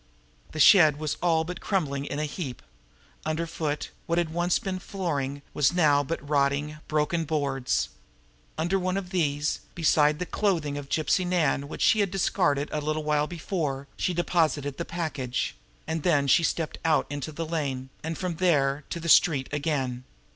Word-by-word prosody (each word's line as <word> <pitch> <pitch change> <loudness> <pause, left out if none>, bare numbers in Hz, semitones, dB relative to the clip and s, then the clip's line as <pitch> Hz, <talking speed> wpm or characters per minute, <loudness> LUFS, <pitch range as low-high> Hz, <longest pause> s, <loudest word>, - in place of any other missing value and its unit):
The 155 - -6
shed 155 -4 +7
was 155 -1 -2
all 165 -2 +3
but 180 +3 -6
crumbling 145 -8 -1
in 145 - -4
a 150 - 0
heap. 145 -5 -6 0.6
Underfoot, 155 -1 -2 0.2
what 170 - 0
had 170 -2 0
once 175 +1 +2
been 190 -2 -4
flooring, 145 -8 -3
was 150 +2 +3
now 150 -5 +4
but 145 0 -5
rotting, 145 +1 +1
broken 155 +2 0
boards. 140 -5 -1 0.7
Under 175 +4 +1
one 185 +1 -1
of 190 -2 -5
these, 150 -4 0 0.2
beside 150 -2 +3
the 180 - -3
clothing 170 -8 0
of 145 -1 -6
Gypsy 160 +5 +1
Nan 165 -6 +1
which - - -4
she 220 - +5
had 200 -2 +2
discarded 175 -6 +1
but 150 - -2
a - - -8
little 155 +1 -1
while 150 0 +1
before, 155 -5 -3
she - - 0
deposited 160 -5 0
the 170 - -3
package; 155 -8 -3 0.3
then 160 -3 +1
stepped 165 +2 +2
out 160 -1 +3
into 145 +1 -4
the 165 +2 -4
lane, 140 -5 -3
and 160 +1 -3
from 180 -3 -3
there 145 -5 +2
to 170 - -4
the 170 - -6
street 145 -5 +5
again. 140 -4 -1
155 Hz, 170 wpm, -27 LUFS, 145-175 Hz, 0.7 s, shed